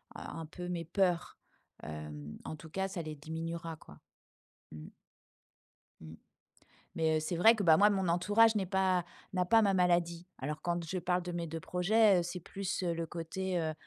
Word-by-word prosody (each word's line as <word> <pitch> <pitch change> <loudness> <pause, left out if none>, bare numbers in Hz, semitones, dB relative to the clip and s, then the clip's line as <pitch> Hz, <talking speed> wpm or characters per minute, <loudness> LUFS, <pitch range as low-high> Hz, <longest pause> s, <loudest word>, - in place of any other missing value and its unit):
un - - -7
un 160 - -6
peu 180 +2 -7
mes 170 -2 -3
peurs, 180 -1 0 0.5
hem, 75 -1 -7
en 155 - -5
tout 160 +1 -12
cas 190 +2 -1
ça 180 - -4
les 155 -1 -6
diminuera 165 +2 -5
quoi. 75 - -16 0.7
Mmh. 75 0 -9 1.1
Mmh. 80 0 -10 0.8
Mais 160 -1 +2
heu, - - +1
c'est 165 +3 -3
vrai 225 +7 +6
que, 205 - -2
bah, 160 -3 +6
moi 205 +3 +6
mon 190 -3 0
entourage 210 +6 +4
n'est 195 - +1
pas 190 -2 +2 0.3
n'a 180 -1 +1
pas 225 +4 +5
ma 200 -2 +3
maladie. 175 -1 +1
Alors 150 +3 -4
quand 175 -1 -1
je 185 +3 -3
parle 180 0 0
de 180 - -5
mes 170 -1 -3
2 165 +1 -5
projets, 195 +3 +3
heu, - - 0
c'est 175 +1 -5
plus 190 +2 -4
le 170 -1 -1
côté, 175 +3 -3
heu 160 -1 -1
175 Hz, 190 wpm, -32 LUFS, 160-190 Hz, 1.1 s, vrai